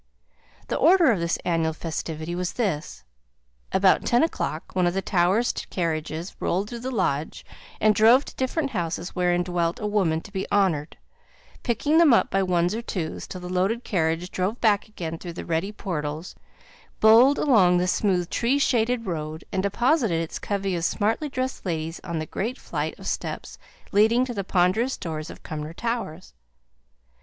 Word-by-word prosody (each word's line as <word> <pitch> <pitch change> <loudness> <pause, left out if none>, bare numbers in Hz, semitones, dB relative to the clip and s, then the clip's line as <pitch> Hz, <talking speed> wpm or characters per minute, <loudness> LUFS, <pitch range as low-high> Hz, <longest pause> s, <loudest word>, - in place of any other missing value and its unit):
The - - -1
order 335 -1 +5
of 205 - 0
this 170 0 0
annual 165 -2 +1
festivity 160 0 -5
was 180 0 -2
this. 150 - -3 0.7
About 190 0 +4
ten 240 +3 +3
o'clock 180 - -3
one 180 -1 +3
of 175 - -1
the 195 - 0
Towers' 195 +5 +2 0.2
carriages 165 0 -3
rolled 195 +4 -1
through 240 - -5
the 255 +2 -4
lodge, 160 - -2 0.3
and 215 0 +4
drove 230 +6 +5
to - - -10
different 275 +2 -1
houses, 175 -3 -3
wherein 180 -1 +2
dwelt 175 -1 -1
a - - -4
woman 190 -7 +1
to 200 - -13
be 190 -1 -3
honoured; 180 -7 +1 0.6
picking 290 +7 +2
them 305 -8 +7
up - - +1
by 195 - +2
ones 180 -1 +1
or 225 - -3
twos, 175 -8 -4
till 185 - -7
the 180 - -6
loaded 190 +7 0
carriage 165 -1 -1
drove 190 +6 -2
back 210 -3 +2
again 165 -6 -6
through 175 -2 -7
the - - -7
ready 170 +5 -1
portals, 160 -5 -4 0.7
bowled 235 +6 +7
along 190 -11 +4
the 180 +1 +1
smooth 185 -2 +1
tree 245 +4 +1
shaded 245 -3 +1
road, 155 -3 -4
and 190 -2 0
deposited 225 - +1
its 165 -1 -4
covey 195 -2 -2
of 170 - -3
smartly 220 - 0
dressed 260 -1 -3
ladies 165 -2 -3
on 170 -1 -4
the 155 - -2
great 230 +10 -3
flight - - -4
of - - -12
steps - - -4 0.3
leading 225 +5 +4
to 250 - -5
the 200 -3 -3
ponderous 190 +8 +1
doors 160 -1 -5
of - - -11
Cumnor 155 0 -6
Towers. 230 -8 -4
185 Hz, 175 wpm, -25 LUFS, 170-230 Hz, 0.7 s, them